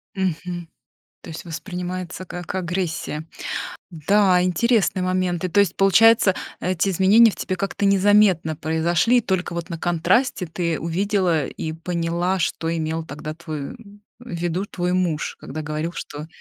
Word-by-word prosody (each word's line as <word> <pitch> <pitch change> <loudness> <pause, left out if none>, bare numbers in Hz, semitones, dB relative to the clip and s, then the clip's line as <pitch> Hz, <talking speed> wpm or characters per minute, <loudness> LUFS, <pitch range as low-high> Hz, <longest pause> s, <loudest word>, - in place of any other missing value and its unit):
Мгм. 175 -2 -3 0.5
То - - -11
есть 160 - -7
воспринимается 180 +2 -5
как 175 0 -6
агрессия. 170 -3 -3 0.6
Да, 185 +3 +3
интересные 185 +1 +2
моменты. 185 -1 0
То 205 - +2
есть, 195 -3 +3
получается, 205 +1 +5 0.3
эти 185 +1 0
изменения 195 +5 +6
в - - -10
тебе 185 - -3
как-то 195 +2 -2
незаметно 195 -4 +4
произошли, 165 +9 +2
и - - +3
только 190 -4 -1
вот 170 +1 -5
на 170 - -4
контрасте 175 +5 +1
ты 165 0 -2
увидела 175 -2 +1
и 160 +4 -5
поняла, 170 +2 -1
что 165 0 -1
имел 160 0 -2
тогда 150 +1 -7
твой 155 - -6 0.4
в 245 +1 -14
виду 175 +3 -2
твой 180 -2 -2
муж, 175 -5 -1
когда 155 - -6
говорил, 155 +2 -3
что 150 -2 -7
175 Hz, 145 wpm, -22 LUFS, 165-190 Hz, 0.6 s, изменения